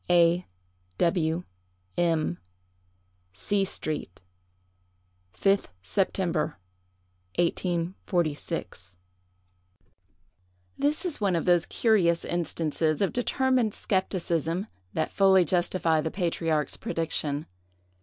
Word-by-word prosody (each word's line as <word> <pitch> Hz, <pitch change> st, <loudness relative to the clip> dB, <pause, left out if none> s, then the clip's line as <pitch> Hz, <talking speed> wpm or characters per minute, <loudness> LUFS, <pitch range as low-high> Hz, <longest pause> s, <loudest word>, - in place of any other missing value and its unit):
"A—— 175 Hz, 0 st, +4 dB, 0.5 s
W—— 170 Hz, -1 st, +1 dB, 0.5 s
M——. 170 Hz, -1 st, +1 dB, 0.9 s
"C—— 195 Hz, -, 0 dB
street, 150 Hz, -, -4 dB, 1.2 s
5th 195 Hz, 0 st, +3 dB, 0.2 s
September, 170 Hz, -, 0 dB, 0.8 s
1846." 170 Hz, -, -1 dB, 1.8 s
This 295 Hz, +5 st, 0 dB
is 330 Hz, -10 st, -2 dB
one 195 Hz, -3 st, +2 dB
of 165 Hz, -, 0 dB
those 175 Hz, -2 st, +4 dB
curious 185 Hz, -7 st, +2 dB
instances 160 Hz, -2 st, -1 dB
of 195 Hz, -, 0 dB
determined 250 Hz, -2 st, +1 dB
skepticism 180 Hz, -2 st, -1 dB, 0.3 s
that 160 Hz, -, -1 dB
fully 190 Hz, -2 st, +5 dB
justify 170 Hz, -1 st, +2 dB
the 160 Hz, -, -2 dB
patriarch's 165 Hz, -4 st, 0 dB
prediction. 155 Hz, -8 st, -2 dB
175 Hz, 80 wpm, -27 LUFS, 160-190 Hz, 1.8 s, fully